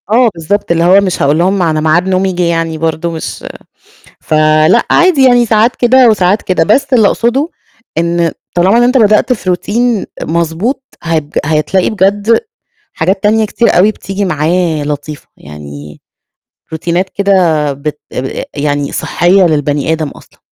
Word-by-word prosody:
آه، 235 Hz, +2 st, +3 dB
بالضبط، 170 Hz, +4 st, -2 dB
اللي 165 Hz, 0 st, +1 dB
هو 185 Hz, +3 st, +5 dB
مش 190 Hz, -3 st, -2 dB
هاقول 145 Hz, +2 st, +2 dB
لهم 190 Hz, +3 st, +1 dB
م -, -, 0 dB
أنا 160 Hz, -3 st, 0 dB
ميعاد 160 Hz, +4 st, +1 dB
نومي 190 Hz, 0 st, 0 dB
جِه 180 Hz, 0 st, -1 dB
يعني 165 Hz, -1 st, -1 dB
برضه 160 Hz, +1 st, -2 dB
مش 160 Hz, -1 st, -7 dB, 0.7 s
فلأ، 155 Hz, +6 st, +2 dB
عادي 340 Hz, -6 st, +3 dB
يعني 245 Hz, -2 st, +4 dB
ساعات 225 Hz, +2 st, +2 dB
كده 250 Hz, 0 st, +4 dB
وساعات 205 Hz, -1 st, +1 dB
كده، 180 Hz, -3 st, 0 dB
بس 240 Hz, +9 st, +1 dB
اللي 225 Hz, -5 st, +4 dB
أقصده 260 Hz, +10 st, 0 dB, 0.5 s
إن 170 Hz, 0 st, 0 dB, 0.2 s
طالما 185 Hz, +6 st, +3 dB
إن 240 Hz, -, +3 dB
أنت 250 Hz, +2 st, +2 dB
بدأت 215 Hz, +2 st, +3 dB
في 190 Hz, -5 st, -3 dB
Routine 230 Hz, +3 st, -1 dB, 0.2 s
مضبوط 170 Hz, -, -2 dB, 0.2 s
هت 165 Hz, -2 st, -1 dB, 0.2 s
هتلاقي 160 Hz, +5 st, 0 dB
بجد 205 Hz, +2 st, +1 dB, 0.5 s
حاجات 190 Hz, +1 st, -1 dB
تانية 220 Hz, +1 st, +2 dB
كتير 230 Hz, +2 st, 0 dB
أوي 195 Hz, +4 st, +4 dB
بتيجي 200 Hz, -1 st, -5 dB
معاه 165 Hz, -1 st, -1 dB
لطيفة، 145 Hz, 0 st, -6 dB
يعني 75 Hz, 0 st, -11 dB, 0.7 s
روتينات 170 Hz, +3 st, -2 dB
كده 200 Hz, 0 st, -1 dB, 0.4 s
بت 150 Hz, +2 st, -6 dB
آآ 130 Hz, +1 st, -5 dB
يعني 145 Hz, 0 st, -2 dB
صحيّة 185 Hz, +3 st, +1 dB
للبني 145 Hz, -1 st, 0 dB
آدم 160 Hz, -2 st, -2 dB
أصلًا. -, -, -17 dB
180 Hz, 155 wpm, -12 LUFS, 155-215 Hz, 0.7 s, هو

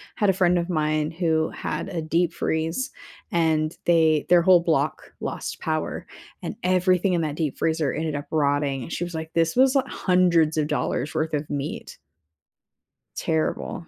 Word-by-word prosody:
had 205 Hz, -, +1 dB
a -, -, +4 dB
friend 180 Hz, -1 st, +3 dB
of 170 Hz, +1 st, -2 dB
mine 155 Hz, -1 st, 0 dB
who 160 Hz, -2 st, 0 dB
had -, -, -4 dB
a 170 Hz, -3 st, -3 dB
deep 165 Hz, +2 st, 0 dB
freeze, 165 Hz, -, -1 dB, 0.4 s
and 160 Hz, -2 st, +1 dB
they 160 Hz, -3 st, +3 dB
their 175 Hz, -1 st, +6 dB
whole 180 Hz, +1 st, +6 dB
block 165 Hz, -2 st, -1 dB
lost -, -, -5 dB
power, -, -, -3 dB, 0.3 s
and -, -, -5 dB
everything 185 Hz, 0 st, +2 dB
in 170 Hz, -, +1 dB
that 150 Hz, -2 st, -2 dB
deep 155 Hz, -4 st, -2 dB
freezer 160 Hz, -3 st, 0 dB
ended 155 Hz, -1 st, -2 dB
up 145 Hz, -, -4 dB
rotting, 145 Hz, -3 st, +1 dB
and, -, -, -9 dB
she 175 Hz, -, -2 dB
was 175 Hz, -, -5 dB
like, 160 Hz, 0 st, -5 dB
"This 165 Hz, -1 st, +1 dB
was 260 Hz, +2 st, +4 dB
li 270 Hz, -, +4 dB
hundreds 170 Hz, -4 st, +2 dB
of 150 Hz, -, +2 dB
dollars 140 Hz, -1 st, -2 dB
worth 155 Hz, 0 st, -1 dB
of 145 Hz, 0 st, -3 dB
meat." 145 Hz, -, -5 dB, 1.2 s
Terrible. 160 Hz, +1 st, -2 dB
160 Hz, 175 wpm, -24 LUFS, 155-175 Hz, 1.2 s, their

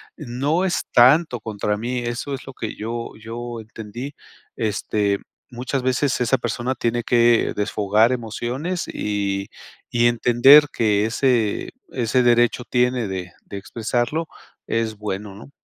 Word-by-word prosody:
no 145 Hz, +5 st, -1 dB
es 190 Hz, -2 st, 0 dB
tanto 125 Hz, 0 st, +5 dB
contra 105 Hz, -1 st, -2 dB
mí, 120 Hz, +3 st, -2 dB
eso 120 Hz, +4 st, -4 dB
es 135 Hz, -, -6 dB
lo 135 Hz, -, -8 dB
que 110 Hz, -, -5 dB
yo 115 Hz, +2 st, -5 dB
yo 120 Hz, +1 st, -6 dB
entendí. 110 Hz, +5 st, -8 dB, 0.4 s
Este, 105 Hz, -2 st, 0 dB, 0.3 s
muchas 125 Hz, +2 st, -3 dB
veces 130 Hz, +1 st, +1 dB
esa 125 Hz, +2 st, +3 dB
persona 120 Hz, +2 st, -2 dB
tiene 120 Hz, -1 st, -1 dB
que 120 Hz, -1 st, +3 dB
desfogar 105 Hz, +3 st, +2 dB
emociones 125 Hz, -, -3 dB
y 100 Hz, -1 st, -2 dB, 0.4 s
y 120 Hz, 0 st, +4 dB
entender 125 Hz, +5 st, +6 dB
que 105 Hz, -2 st, +2 dB
ese 115 Hz, -2 st, +1 dB, 0.2 s
ese 125 Hz, 0 st, +1 dB
derecho 120 Hz, 0 st, +3 dB
tiene 125 Hz, -2 st, +1 dB
de 90 Hz, -2 st, -5 dB
de 100 Hz, -, -7 dB
expresarlo 120 Hz, +9 st, -2 dB, 0.4 s
es 115 Hz, -1 st, -1 dB
bueno, 105 Hz, -1 st, -5 dB
¿no? 110 Hz, +7 st, -13 dB
120 Hz, 135 wpm, -22 LUFS, 110-125 Hz, 0.4 s, entender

